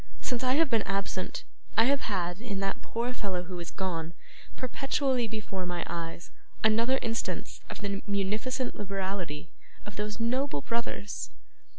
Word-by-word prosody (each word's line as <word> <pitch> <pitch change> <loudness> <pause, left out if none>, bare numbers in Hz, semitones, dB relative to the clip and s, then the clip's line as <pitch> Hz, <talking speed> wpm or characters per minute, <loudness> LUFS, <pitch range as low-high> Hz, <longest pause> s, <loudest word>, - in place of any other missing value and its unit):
Since 250 -1 0
I 255 0 +5
have 315 -2 +5
been 225 -2 +5
absent, 195 -2 -1 0.3
I 225 - +9
have 275 +3 +4
had, 180 -2 0
in 205 -5 -2
that 195 0 0
poor 235 +2 -1
fellow 190 -6 -1
who 180 0 -5
is 170 - -4
gone, 170 -3 -2 0.4
perpetually 260 -1 +2
before 205 -4 -2
my 175 -1 0
eyes, 170 0 -4 0.3
another 230 +4 +5
instance 225 0 -1
of - - -5
the 200 -1 -1
munificent 215 +6 +1
liberality 190 -6 -2 0.3
of 205 -1 -7
these 210 +1 -1
noble 250 - +2
brothers. 230 +1 -1
205 Hz, 150 wpm, -31 LUFS, 185-235 Hz, 0.4 s, I